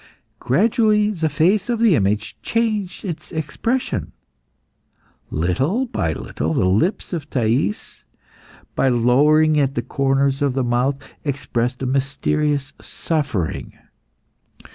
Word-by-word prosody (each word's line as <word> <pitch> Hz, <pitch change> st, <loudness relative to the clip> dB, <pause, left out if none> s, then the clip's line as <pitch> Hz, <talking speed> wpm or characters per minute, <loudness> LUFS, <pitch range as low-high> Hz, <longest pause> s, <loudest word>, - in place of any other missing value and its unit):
Gradually 210 Hz, -, +2 dB
the 160 Hz, -6 st, -1 dB
face 175 Hz, -, +2 dB
of 240 Hz, -, +1 dB
the 225 Hz, -4 st, +5 dB
image 105 Hz, 0 st, 0 dB
changed 215 Hz, -5 st, -1 dB
its 170 Hz, -4 st, -6 dB
expression. 160 Hz, -, -2 dB, 1.2 s
Little 135 Hz, -, 0 dB
by 95 Hz, -, -1 dB
little 80 Hz, +1 st, -3 dB
the -, -, +2 dB
lips 110 Hz, -, 0 dB
of 155 Hz, -3 st, -4 dB
Thais, 115 Hz, -3 st, -1 dB, 0.7 s
by 135 Hz, -, +2 dB
lowering 150 Hz, +6 st, +4 dB
at 140 Hz, -1 st, +1 dB
the 120 Hz, -, -1 dB
corners 135 Hz, +1 st, +1 dB
of 140 Hz, -2 st, +1 dB
the 135 Hz, 0 st, 0 dB
mouth, 125 Hz, +3 st, +1 dB, 0.3 s
expressed 125 Hz, -3 st, -2 dB
a -, -, 0 dB
mysterious 140 Hz, +2 st, 0 dB
suffering. 140 Hz, -, -3 dB
140 Hz, 115 wpm, -21 LUFS, 120-170 Hz, 1.2 s, the